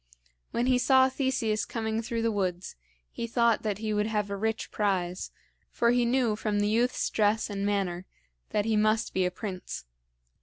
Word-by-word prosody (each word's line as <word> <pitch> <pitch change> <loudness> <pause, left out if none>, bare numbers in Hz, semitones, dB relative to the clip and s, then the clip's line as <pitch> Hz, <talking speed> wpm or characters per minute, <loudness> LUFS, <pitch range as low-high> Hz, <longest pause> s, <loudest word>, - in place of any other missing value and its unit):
When 240 - 0
he 255 -1 +3
saw 260 0 +5
Theseus 255 -5 0
coming 220 -1 -2
through 230 0 -3
the 230 - +2
woods, 185 -3 -2 0.4
he 230 - -4
thought 235 -1 +2
that 210 -3 -2
he 215 0 -2
would 210 0 +1
have 210 -2 -1
a - - -1
rich 220 +2 -2
prize, 185 -4 -1 0.4
for 235 0 +2
he 245 0 +3
knew 240 -3 +2
from 210 -1 -1
the 205 0 +2
youth's 235 +3 +1
dress 215 0 +1
and 200 -1 -3
manner 190 -3 -1 0.4
that 210 -1 0
he 225 -1 +1
must 215 +1 +2
be 185 -1 +2
a - - 0
prince. 185 - -6
215 Hz, 185 wpm, -28 LUFS, 205-230 Hz, 0.4 s, saw